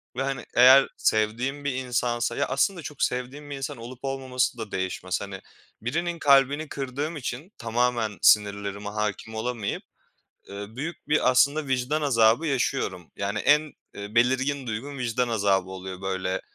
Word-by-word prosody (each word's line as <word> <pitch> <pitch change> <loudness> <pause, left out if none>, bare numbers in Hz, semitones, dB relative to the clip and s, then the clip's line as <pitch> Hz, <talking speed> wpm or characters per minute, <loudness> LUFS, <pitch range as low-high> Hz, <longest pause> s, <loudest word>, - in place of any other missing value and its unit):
Ve, - - -1
hani, 135 -2 -3
eğer 130 +2 +8
sevdiğim 120 +7 0
bir 140 - 0
insansa 120 -2 -1
ya - - +1
aslında 170 +7 +1
çok 145 0 -4
sevdiğim 130 +4 -3
bir 145 - -4
insan 135 +1 -5
olup 120 +2 -9
olmaması 130 -2 -1
da 110 -3 -6
değişmez. 95 0 -2
Hani, 95 -1 -7 0.4
birinin 170 +8 -2
kalbini 140 +2 +4
kırdığım 140 +4 -4
için 140 +6 -5
tamamen 115 -2 0
sinirlerime 100 0 +3
hâkim 105 +1 -3
olamayıp, 110 -2 -3 0.7
eee, 100 +1 -6
büyük 155 +3 -6
bir 150 -3 +4
aslında 140 +4 +3
vicdan 130 +4 0
azabı 120 +2 +4
yaşıyorum. 125 - -1
Yani 100 +2 -2
en, 150 +5 +3 0.2
eee, 100 +1 -8
belirgin 130 +3 +2
duygum 130 +6 -5
vicdan 125 0 0
azabı 100 -4 +1
oluyor, 95 0 -7
böyle, 95 0 -2
125 Hz, 150 wpm, -26 LUFS, 105-140 Hz, 0.7 s, eğer